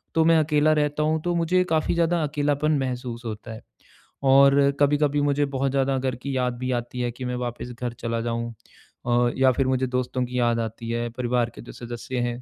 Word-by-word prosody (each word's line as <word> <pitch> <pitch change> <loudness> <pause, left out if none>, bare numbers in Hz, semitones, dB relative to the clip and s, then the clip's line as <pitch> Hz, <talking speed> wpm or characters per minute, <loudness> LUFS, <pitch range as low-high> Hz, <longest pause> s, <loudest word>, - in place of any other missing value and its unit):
तो 160 - +4
मैं 165 0 +5
अकेला 155 0 +3
रहता 150 0 0
हूँ, 155 +1 +1
तो 175 +1 -1
मुझे 175 +2 +2
काफ़ी 160 -1 +1
ज़्यादा 170 0 +2
अकेलापन 145 +1 0
महसूस 125 -2 -4
होता 110 0 -6
है। 110 - -10 0.6
और 140 +1 +6
कभी-कभी 145 0 +2
मुझे 145 0 +2
बहुत 135 0 0
ज़्यादा 135 0 +1
घर 130 -1 -1
की 135 +2 -5
याद 125 -1 0
भी 130 0 -2
आती 120 +1 -3
है 120 0 -1
कि 125 +2 -7
मैं 125 0 -2
वापस 125 0 -5
घर 120 -1 -2
चला 115 0 -2
जाऊँ, 115 0 -3 0.5
अ, 120 0 +3
या 130 0 +5
फिर 135 0 0
मुझे 130 0 +1
दोस्तों 125 0 -1
की 125 +1 -3
याद 120 -1 +2
आती 115 +1 -5
है, 120 0 -2
परिवार 120 0 -1
के - - -9
जो 120 - -10
सदस्य 120 +1 -6
हैं 120 +1 -6
130 Hz, 215 wpm, -24 LUFS, 120-145 Hz, 0.6 s, और